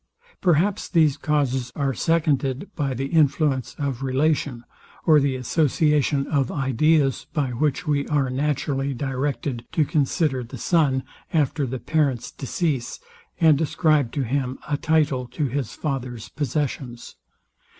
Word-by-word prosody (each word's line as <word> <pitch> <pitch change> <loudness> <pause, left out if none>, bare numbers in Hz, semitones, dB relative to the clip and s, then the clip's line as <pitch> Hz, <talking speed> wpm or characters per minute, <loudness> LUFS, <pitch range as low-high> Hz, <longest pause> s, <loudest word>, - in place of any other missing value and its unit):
Perhaps 185 +3 +2
these 155 -5 +4
causes 135 -4 0
are 140 -2 0
seconded 150 - 0
by 140 -4 -1
the 135 +3 -2
influence 145 -3 +1
of 135 -3 -3
relation, 135 -2 0 0.4
or 155 -2 +6
the 140 -2 +1
association 145 +1 +1
of 140 -4 0
ideas, 135 +1 +1
by 145 -5 0
which 150 +7 -1
we 145 -2 0
are 140 -4 +1
naturally 140 0 -1
directed 135 -1 -2
to 155 - +2
consider 145 -2 +1
the 125 +3 -9
son 135 -2 +2 0.3
after 150 -2 +1
the 130 +2 -3
parent's 135 -2 0
decease, 140 -2 -2 0.4
and 160 -3 +5
ascribe 155 -4 +2
to 140 - -1
him 130 +1 -2
a 150 - 0
title 150 -5 +1
to 145 +5 -2
his 130 -3 -3
father's 125 -6 -4
possessions. 135 -4 -3
140 Hz, 130 wpm, -23 LUFS, 130-155 Hz, 0.4 s, or